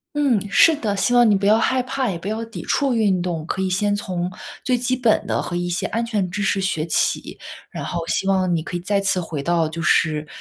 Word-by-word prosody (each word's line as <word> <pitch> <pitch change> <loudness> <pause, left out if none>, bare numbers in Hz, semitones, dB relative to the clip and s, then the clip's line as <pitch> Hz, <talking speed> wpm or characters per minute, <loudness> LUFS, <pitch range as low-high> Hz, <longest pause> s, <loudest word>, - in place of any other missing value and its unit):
嗯， 275 -8 +2
是 325 +9 +5
的， 210 -8 -2
希 195 +6 +2
望 240 -2 +5
你 205 - +4
不 195 - -1
要 210 +2 +5
害 255 +2 +1
怕， 260 0 -2
也 180 - -3
不 170 - -8
要 220 +2 -3
抵 225 - -8
触 275 -3 0
运 200 -5 +2
动， 170 -3 -3
可 190 +3 -3
以 190 - 0
先 205 +3 +1
从 180 -3 -3 0.3
最 255 - +1
基 250 +1 0
本 240 -4 +2
的， - - 0
和 175 - -4
一 175 0 -2
些 175 - -1
安 230 +2 -2
全 215 -5 -1
知 205 - -3
识 200 0 +1
学 190 -5 -1
起。 - - 0 0.3
然 - - -6
后 170 -1 -3
希 - - -1
望 185 -2 +2
你 160 - -2
可 175 - -6
以 - - -1
再 200 +3 0
次 195 -2 +2
回 160 -4 -5
到， 165 0 +1
就 165 +1 -5
是 155 -1 +2
195 Hz, 270 characters per minute, -21 LUFS, 175-230 Hz, 0.3 s, 是